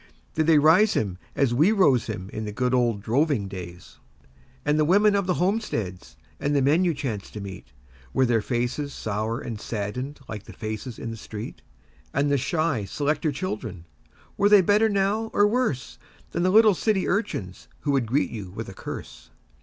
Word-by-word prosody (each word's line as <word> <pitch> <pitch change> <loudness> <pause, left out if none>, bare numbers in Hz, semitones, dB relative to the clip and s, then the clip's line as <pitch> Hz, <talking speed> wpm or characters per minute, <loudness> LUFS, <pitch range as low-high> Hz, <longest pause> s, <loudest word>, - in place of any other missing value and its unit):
Did 155 0 +1
they 160 -2 +6
rise 165 +8 +5
him 95 -4 -1 0.2
as 135 -4 +2
we 155 - +4
rose 150 - +3
him 95 -4 -5
in 110 - -4
the 105 - -4
good 125 +4 0
old 120 -5 +1
droving 130 -2 +1
days? 90 -2 -9 0.7
And 150 +1 +2
the - - +5
women 200 +6 +4
of 200 -2 0
the 180 - +2
homesteads 110 - -2 0.2
and 145 +1 0
the 140 - +3
men 155 +7 +4
you 170 -3 +1
chanced 115 -8 -4
to 105 - -6
meet 100 -7 -8 0.4
Were 130 - +3
their 115 -2 +2
faces 125 +5 -2
sour 110 +2 -2
and 110 -3 -6
saddened 125 +7 -4
like 105 -2 -7
the - - -11
'faces 110 +1 -5
in 115 - -5
the 115 - -7
street', 110 0 -8 0.5
And 140 +1 +2
the 140 - +3
'shy 145 - 0
selector 150 +7 0
children' 110 - -5 0.5
were 205 - +4
they 205 -2 +8
better 210 +4 +3
now 205 +2 0
or 205 - +5
worse 215 - -1 0.3
Than 170 - -1
the 180 - +3
little 215 +1 +6
city 195 +1 0
urchins 105 - -2
who 145 - 0
would 135 -4 +1
greet 140 +6 +1
you 105 -5 -6
with 105 +3 -7
a - - -8
curse? - - -8
135 Hz, 190 wpm, -25 LUFS, 110-175 Hz, 0.7 s, they